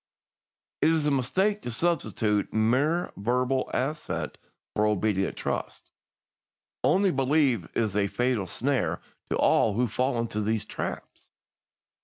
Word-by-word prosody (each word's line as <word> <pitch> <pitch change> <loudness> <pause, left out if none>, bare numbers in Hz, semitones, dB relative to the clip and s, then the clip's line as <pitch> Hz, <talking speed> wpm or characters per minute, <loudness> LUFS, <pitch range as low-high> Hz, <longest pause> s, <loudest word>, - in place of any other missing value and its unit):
"It - - +5
is 160 -2 +2
a 150 - +2
mistake 190 +11 +1
to - - -5
substitute 110 - 0
mere 130 +10 +1
verbal 125 +5 0
assent 150 +4 -3 0.4
for 105 0 +3
obedient 105 -2 0
trust. - - -4 0.9
'Only 195 0 +4
believe' 135 - +2
is 110 -4 0
a 100 -1 +2
fatal 120 -2 0
snare 135 +1 -1 0.3
to - - 0
all 105 - +3
who 125 +3 +2
fall 125 +3 0
into 115 -2 -2
these 110 +1 -1
traps. - - -6
125 Hz, 125 wpm, -27 LUFS, 105-145 Hz, 0.9 s, It